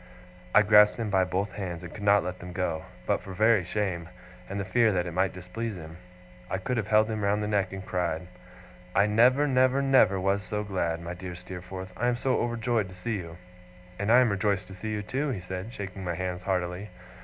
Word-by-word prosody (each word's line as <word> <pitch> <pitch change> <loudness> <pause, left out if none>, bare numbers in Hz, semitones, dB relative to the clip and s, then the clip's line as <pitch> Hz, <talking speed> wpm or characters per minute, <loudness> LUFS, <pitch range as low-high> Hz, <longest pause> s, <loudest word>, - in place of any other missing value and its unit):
I 105 - +8
grasped 105 0 +6
him 115 -3 -2
by 95 -1 +3
both 95 +3 -2
hands, 90 -4 -5
and 85 - -8
could 105 - -9
not 100 -1 +4
let 90 +1 -5
them 90 +1 -8
go. 90 -4 -2 0.2
But - - +1
for 95 - -8
very 110 -1 +4
shame, 90 -2 -2 0.4
and 100 +1 -3
the 100 - -2
fear 115 +1 +3
that 90 -2 0
it 90 - -4
might 90 +1 +1
displease 95 +5 -5
him, 80 -1 -9 0.5
I - - -1
could 120 +7 -2
have 110 -3 -1
held 110 0 +4
him 110 -2 -3
round 105 +1 +1
the - - -1
neck 100 -2 +1
and 95 0 -7
cried. 90 -2 -1 0.7
'I 100 - +5
never, 125 +7 +4
never, 130 0 +3
never 130 -8 +4
was 95 +2 +1
so 105 +1 -3
glad! 85 -5 -2
My 85 +1 -5
dear 90 0 -7
Steerforth, 95 +1 -8
I 120 - 0
am 125 - +2
so 130 +1 0
overjoyed 120 -3 0
to 90 - -12
see 110 +4 -3
you!' 85 -2 -8 0.6
'And 100 +2 +1
I 125 +2 +8
am 120 -4 +3
rejoiced 100 -1 0
to - - -8
see 105 +4 -6
you, 105 -1 -2
too!' 140 +7 -2
he 125 - -2
said, 95 +4 -6
shaking 95 -3 -6
my 85 -2 -2
hands 90 0 -3
heartily. 90 +1 -2
100 Hz, 225 wpm, -28 LUFS, 90-110 Hz, 0.7 s, I